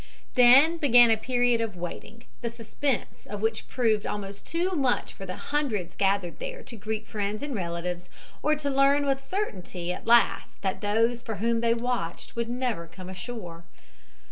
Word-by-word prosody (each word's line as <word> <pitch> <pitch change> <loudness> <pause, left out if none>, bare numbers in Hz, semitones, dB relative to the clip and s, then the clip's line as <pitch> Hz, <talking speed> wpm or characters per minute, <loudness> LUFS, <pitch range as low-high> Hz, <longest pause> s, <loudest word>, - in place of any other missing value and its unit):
Then 270 +7 +7
began 245 -6 +6
a - - +6
period 245 +1 +1
of 225 -4 -3
waiting, 210 +6 -7 0.2
the 235 - -2
suspense 235 +2 -3
of 205 - -5
which 220 +1 -1
proved 220 -4 +1
almost 200 -1 -5
too 345 +3 0
much 270 -8 0
for 195 - -9
the 185 - -4 0.2
hundreds 230 - -1
gathered 195 -3 0
there - - -6
to 235 - -9
greet 215 0 -4
friends 210 +2 -3
and 290 -1 -3
relatives 175 -2 -3 0.3
or 305 0 +3
to 295 -1 -2
learn 275 +1 +4
with 270 -1 0
certainty 185 - -3
at - - -9
last 235 0 +3
that 190 -1 -1
those 230 +3 +1
for 225 -2 -5
whom 230 +2 0
they 230 0 +3
watched 235 -7 -3
would 235 0 -2
never 240 -8 -2
come 180 +2 -10
ashore. 185 -3 -7
230 Hz, 170 wpm, -27 LUFS, 200-255 Hz, 0.3 s, Then